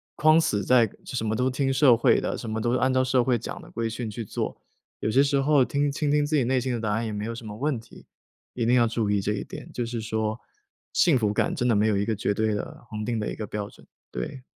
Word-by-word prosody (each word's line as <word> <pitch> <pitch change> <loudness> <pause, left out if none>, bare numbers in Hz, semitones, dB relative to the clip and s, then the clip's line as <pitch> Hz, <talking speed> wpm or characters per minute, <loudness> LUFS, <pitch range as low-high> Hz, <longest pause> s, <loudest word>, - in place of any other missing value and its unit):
框 155 0 +5
死 105 -11 0
在 120 0 +4 0.2
什 125 -4 -3
么 110 0 0
都 125 +2 +1
听 135 +1 0
社 130 -3 +6
会 115 - +4
的， - - -2
什 115 - -6
么 110 0 -2
都 120 +2 0
是 - - +3
按 130 0 +2
照 130 - +3
社 130 -1 +2
会 125 -2 +2
讲 - - -7
的 - - -14
规 115 -1 -2
矩 115 0 -4
去 110 +2 -6
做。 - - -4 0.4
有 - - -1
些 135 +5 +4
时 140 0 +1
候 140 0 +4
听 145 +3 0
倾 145 +1 -1
听 150 0 +3
自 155 +1 0
己 140 - +3
内 130 +2 +1
心 125 0 -2
的 115 - -3
答 110 -2 -1
案 110 +2 0
也 110 - -4
没 105 0 -4
有 115 - -3
什 115 -1 -9
么 105 - -7
问 135 +2 -1
题， 115 - -16 0.5
一 120 - -1
定 120 +2 +4
要 120 -2 +5
注 110 -2 -1
意 100 -1 +2
这 105 +2 -1
一 100 - -3
点， - - -9
就 120 - -3
是 115 -1 -4
说， 110 0 -2 0.5
幸 165 -7 +4
福 105 -4 +1
感 - - 0
真 125 - -1
的 115 - +4
没 105 +2 +3
有 105 - +2
一 100 - +1
个 110 +2 0
绝 105 -1 -1
对 110 +1 0
的、 105 - -6
恒 105 0 -4
定 115 0 -1
的 105 - -2
一 - - -5
个 105 - -5
标 105 -1 -4
准， - - -19 0.2
对。 60 - -5
115 Hz, 315 characters per minute, -26 LUFS, 110-130 Hz, 0.5 s, 社